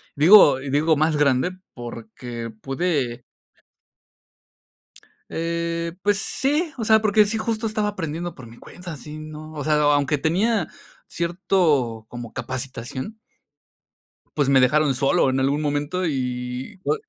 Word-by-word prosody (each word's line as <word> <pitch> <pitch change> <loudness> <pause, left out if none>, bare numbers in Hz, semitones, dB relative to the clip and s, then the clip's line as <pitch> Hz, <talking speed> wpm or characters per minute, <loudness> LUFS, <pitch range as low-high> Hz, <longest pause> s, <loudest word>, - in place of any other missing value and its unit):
digo 150 -3 +7
y 135 - -6
digo 155 +3 +3
más 155 0 +2
grande, 140 +4 +2 0.2
porque 115 0 -7
pude 135 -4 -1 2.1
Eh, 170 0 -2
pues 205 -1 +3
sí, 300 +7 0
o 230 - -3
sea, 220 0 +5
porque 215 0 +4
sí 220 +2 -1
justo 225 0 -2
estaba 215 -1 0
aprendiendo 175 -3 -4
por 130 -3 -11
mi 115 +1 -14
cuenta, 175 +1 -9
sí, 150 +3 -9
no, 155 0 -9
o 145 - -5
sea, 155 +1 +2 0.2
aunque 145 +1 +1
tenía 180 +5 +1 0.4
cierto 170 - 0
como 120 -2 -8
capacitación. 130 - -5 1.2
Pues 145 -2 +2
me 135 -1 +5
dejaron 140 +1 +3
solo 135 0 +2
en 130 0 0
algún 140 +3 +1
momento 145 +5 -1
y 125 +4 -4
o - - +2
155 Hz, 135 wpm, -23 LUFS, 130-180 Hz, 2.1 s, digo